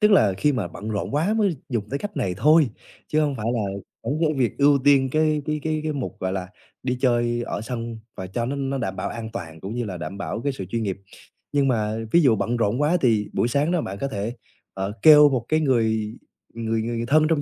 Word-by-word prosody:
tức 210 0 +5
là 105 - +5
khi 145 +9 +2
mà 110 -9 -2
bận 105 +5 -7
rộn 105 +5 -3
quá 170 +9 +2
mới 200 -8 +1
dùng 110 -5 -2
tới 140 - -1
cách 205 +5 -6
này 90 -2 -1
thôi, 150 +2 +5 0.4
chứ 155 - +2
hông 145 -3 0
phải 110 0 -4
là 115 - 0 0.4
vẫn 145 - -1
cái 155 -2 +2
việc 125 0 0
ưu 140 0 +5
tiên 135 -2 +5
cái 155 -1 +2
cái 150 -1 -1
cái 155 -1 -1
cái 155 - 0
mục, 140 -4 -4
gọi 95 0 -1
là, 95 -1 -3 0.3
đi 125 -1 -1
chơi 120 -2 +2
ở - - -3
sân, 115 -1 -5 0.2
và 95 - -5
cho 115 +6 -3
nó 140 +2 -2
nó 135 0 -2
đảm 95 -6 -3
bảo - - -2
an 115 -1 -6
toàn, 80 -7 -7
cũng 100 +4 -6
như 120 -1 -2
là 95 -4 -5
đảm 85 +4 -6
bảo 100 +3 -3
cái 140 - 0
sự 100 - -6
chuyên 115 -1 -1
nghiệp. 95 -2 -3 0.5
Nhưng 140 -1 +2
mà 110 -4 0 0.2
ví 170 - +6
dụ 125 -6 +5
bận 120 +4 -1
rộn 115 +5 +1
quá, 165 +5 +3
thì 110 -5 +2
buổi 120 - +1
sáng 145 +7 +1
đó, 175 -3 +1
bạn 100 +1 -5
có 140 - 0
thể, 110 +1 -4 0.4
ờ, 95 +1 -3
kêu 150 -2 +9
một 125 -4 -1
cái 155 0 +3
người 110 -4 +1 0.4
người 115 -1 -1
người 115 0 -2
thân 155 +2 +4
trong 160 -3 +2
120 Hz, 250 wpm, -24 LUFS, 110-145 Hz, 0.5 s, kêu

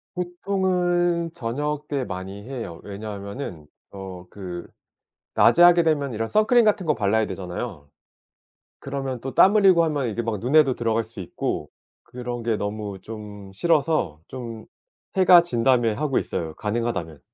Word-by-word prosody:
보통은 175 -2 0
저녁때 145 +3 -3
많이 95 0 -6
해요. 115 -10 -6
왜냐하면은 100 - -7 0.2
어 95 -2 -9
그 90 -3 -7 0.7
낮에 175 - +5
하게 175 0 +7
되면 145 -4 +1
이런 115 +1 -2
선크림 225 +3 +4
같은 205 -3 +2
거 150 - +3
발라야 110 0 +1
되잖아요. 90 -3 -6 0.9
그러면 135 -2 -4
또 135 +2 -6
땀 200 +3 +6
흘리고 190 -5 +6
하면 145 -5 -1
이게 115 +2 -2
막 115 -2 -2
눈에도 135 +2 +4
들어갈 115 -1 0
수 110 0 -15
있고 90 - -4 0.3
그런 120 -1 -6
게 115 -2 +1
너무 105 -1 -4
좀 105 -3 -9
싫어서 155 - +1
좀 115 -4 -7 0.5
해가 180 -2 +8
진다면 120 -7 +2
하고 145 -3 +1
있어요 80 -2 -3
가능하다면. 105 - -3
120 Hz, 295 characters per minute, -24 LUFS, 100-155 Hz, 0.9 s, 해가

